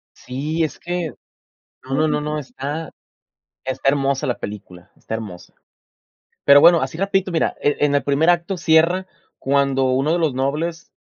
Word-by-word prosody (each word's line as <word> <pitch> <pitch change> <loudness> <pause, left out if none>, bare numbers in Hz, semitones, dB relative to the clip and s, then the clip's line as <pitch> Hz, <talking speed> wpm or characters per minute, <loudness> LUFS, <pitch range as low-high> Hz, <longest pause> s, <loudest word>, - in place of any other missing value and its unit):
Sí, 150 +6 -3
es 155 - -4
que 175 -2 -3 0.7
no, 135 +4 0
no, 150 0 0
no, 150 +1 -3
está 145 +2 -5 0.7
está 130 +1 0
hermosa 135 -1 0
la 125 - -2
película, 100 -2 -9
está - - -8
hermosa. 100 -6 -7 0.9
Pero 140 0 +8
bueno, 170 -1 +7
así 135 +4 -4
rapidito, 195 -1 0
mira, 165 - 0
eh, 145 - +1
en 145 -1 +2
el 140 - +1
primer 145 +4 +2
acto 175 +2 +1
cierra 170 +3 +3 0.3
cuando 135 -1 +1
uno 135 +4 +1
de 175 - +1
los 160 -5 +1
nobles, 155 +6 -3
145 Hz, 155 wpm, -20 LUFS, 135-165 Hz, 0.9 s, Pero